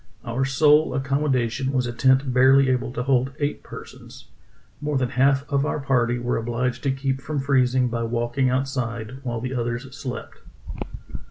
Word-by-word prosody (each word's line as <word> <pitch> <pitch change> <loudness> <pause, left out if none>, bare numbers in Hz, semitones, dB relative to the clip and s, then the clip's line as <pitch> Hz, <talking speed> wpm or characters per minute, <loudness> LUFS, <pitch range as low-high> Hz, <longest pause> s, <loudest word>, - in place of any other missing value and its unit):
Our 125 +3 -1
sole 150 +1 +4
ac 135 - -1
commodation 135 -2 0
was 130 -2 0
a 120 - -4
tent 130 +1 +3
barely 130 +1 +5
able 125 -1 -1
to 125 - -2
hold 130 0 +1
eight 145 -1 -2
per - - -9
sons; - - -14 0.5
more 150 -1 -1
than 125 -2 0
half 135 +2 +2
of 140 -2 +1
our 150 - -1
party 125 -3 +1
were 120 0 -1
obliged 120 +2 -2
to 135 - +3
keep 135 0 -2
from 150 +1 -3
freezing 130 -2 +2
by 115 -1 -2
walking 120 +3 0
outside 125 -2 -2
while 120 -3 -3
the 130 +3 -4
others 120 +2 -3
slept." 125 -2 -7
130 Hz, 175 wpm, -23 LUFS, 120-135 Hz, 0.5 s, barely